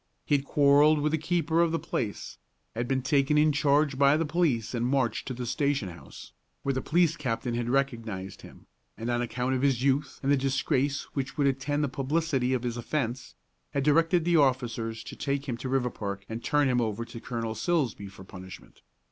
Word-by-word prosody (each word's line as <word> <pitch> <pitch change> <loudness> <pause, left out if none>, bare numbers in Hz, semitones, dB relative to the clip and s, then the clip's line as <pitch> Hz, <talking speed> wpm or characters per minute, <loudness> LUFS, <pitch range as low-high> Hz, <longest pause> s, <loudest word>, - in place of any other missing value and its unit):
He 145 - +3
had 140 0 -1
quarrelled 145 +2 +5
with 150 +1 0
the 160 - 0
keeper 165 0 +1
of 170 -1 +2
the 165 - +1
place, 110 -9 -4 0.3
had 120 +2 -2
been 130 0 0
taken 140 +2 +2
in 150 +1 +5
charge 145 -1 +2
by 140 +1 +5
the 165 - 0
police 150 -9 0
and 120 -1 -1
marched 125 -3 0
to 130 - -3
the 125 0 -4
station 135 -3 0
house, 85 - -12 0.3
where 135 - 0
the 130 - -2
police 170 +1 +2
captain 120 -3 -2
had 120 0 -2
recognized 115 -8 -2
him; - - -14 0.3
and 115 +2 -3
on 120 0 0
account 125 +2 -1
of 130 - 0
his 135 -3 +2
youth 140 0 0
and 135 - +2
the 145 - +4
disgrace 135 +1 0
which 135 +1 -4
would 145 - +2
attend 140 +2 0
the - - +2
publicity 135 -1 0
of 125 - -3
his 120 -1 -2
offence, 125 0 -3 0.4
had 140 - +1
directed 165 +3 +3
the 170 -1 +4
officers 120 -5 0
to 110 - -9
take 140 0 -2
him 125 - -2
to 130 - -5
Riverpark 110 -7 -2
and 115 +1 -6
turn 145 -1 +2
him 125 -1 +2
over 115 0 -2
to 115 - -9
Colonel 115 -2 -3
Silsbee 130 - -1
for 95 0 -13
punishment. 95 0 -12
135 Hz, 205 wpm, -28 LUFS, 120-145 Hz, 0.4 s, quarrelled